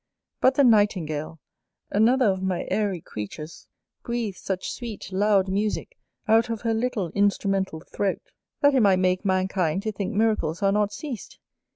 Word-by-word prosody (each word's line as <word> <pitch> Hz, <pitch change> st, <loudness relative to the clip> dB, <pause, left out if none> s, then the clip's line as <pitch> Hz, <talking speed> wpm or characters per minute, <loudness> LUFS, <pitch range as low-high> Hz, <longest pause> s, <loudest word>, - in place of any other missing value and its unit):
But 260 Hz, +1 st, +4 dB
the 280 Hz, -, +4 dB
Nightingale, 180 Hz, -, +2 dB, 0.5 s
another 245 Hz, +5 st, +4 dB
of 190 Hz, -3 st, +1 dB
my 190 Hz, -2 st, -1 dB
airy 200 Hz, -5 st, 0 dB
creatures, 150 Hz, +10 st, -8 dB, 0.3 s
breathes 235 Hz, -6 st, -3 dB
such 190 Hz, -1 st, -3 dB
sweet 225 Hz, -6 st, -7 dB
loud 195 Hz, 0 st, +3 dB
musick 210 Hz, -, -2 dB, 0.3 s
out 225 Hz, +2 st, +4 dB
of 225 Hz, -2 st, -3 dB
her 230 Hz, -1 st, 0 dB
little 220 Hz, -7 st, -1 dB
instrumental 195 Hz, -4 st, 0 dB
throat, 200 Hz, +3 st, -3 dB, 0.3 s
that 285 Hz, -1 st, +5 dB
it 265 Hz, -, +4 dB
might 200 Hz, -4 st, +5 dB
make 185 Hz, +1 st, +1 dB
mankind 185 Hz, -2 st, 0 dB
to 220 Hz, -, -1 dB
think 200 Hz, +1 st, -4 dB
miracles 210 Hz, -5 st, +1 dB
are 195 Hz, -, +4 dB
not 205 Hz, 0 st, +1 dB
ceased. 260 Hz, -2 st, -7 dB
200 Hz, 155 wpm, -25 LUFS, 185-225 Hz, 0.5 s, that